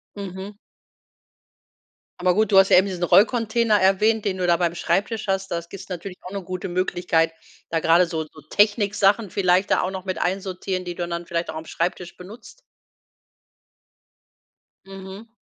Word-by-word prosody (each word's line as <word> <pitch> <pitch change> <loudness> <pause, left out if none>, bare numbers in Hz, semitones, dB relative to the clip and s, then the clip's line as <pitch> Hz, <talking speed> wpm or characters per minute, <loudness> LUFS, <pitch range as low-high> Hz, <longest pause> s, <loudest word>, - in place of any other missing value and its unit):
Mhm. 195 0 -7 1.6
Aber 180 0 +2
gut, 215 +2 +1
du 195 - +5
hast 195 0 +6
ja - - +7
eben 190 +2 +4
diesen 180 -2 -4
Rollcontainer 225 +2 +3
erwähnt, 210 +4 +2
den 190 -2 -1
du 180 -1 -1
da 170 -1 +4
beim 170 -1 0
Schreibtisch 200 +6 -1
hast. 195 0 -1
Das 170 0 -4
gibt 195 - -10
natürlich 180 +1 -7
auch 180 - -9
'ne 200 0 -4
gute 185 +1 -5
Möglichkeit, 175 -2 0 0.4
da 165 - 0
grade 170 +2 +4
so 160 -2 -3
so 155 0 -16
Techniksachen 205 0 +2
vielleicht 185 +1 +2
da - - +3
auch 185 - -2
noch 190 -1 -6
mit 185 -3 -3
einsortieren, 185 0 -2
die 175 -1 -6
du 175 0 -3
dann 170 0 -5
vielleicht 170 -1 -2
auch - - -10
am 160 0 -6
Schreibtisch 175 +1 -3
benutzt. 200 +7 -13 2.2
Mhm. 195 +2 -10
185 Hz, 165 wpm, -23 LUFS, 175-200 Hz, 2.2 s, ja